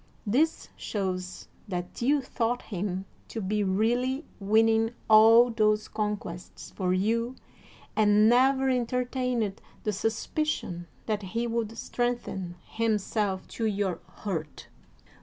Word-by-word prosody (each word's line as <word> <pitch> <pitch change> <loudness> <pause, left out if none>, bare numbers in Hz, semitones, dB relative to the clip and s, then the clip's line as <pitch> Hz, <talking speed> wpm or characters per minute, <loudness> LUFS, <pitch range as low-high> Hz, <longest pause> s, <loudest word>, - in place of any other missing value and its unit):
This 285 +10 +1
shows 185 -3 -4 0.2
that 180 +1 -5
you 280 +4 +3
thought 245 -1 -1
him 190 -1 -3 0.2
to 225 - -5
be 210 +1 0
really 240 +9 +1
winning 225 +2 +3
all 225 +2 +7
those 215 -1 +2
conquests 205 -5 -5
for 185 -2 -1
you 230 +6 +1 0.6
and 210 0 +5
never 265 +3 +4
entertained 250 -3 0 0.2
the 210 - 0
suspicion 220 - -2 0.2
that 215 -2 -1
he 230 +5 -2
would 230 -1 -2
strengthen 235 -8 -2
himself 210 -3 -1
to 225 - -2
your 200 -4 -1
hurt. 165 -7 -5
220 Hz, 110 wpm, -28 LUFS, 195-240 Hz, 0.6 s, all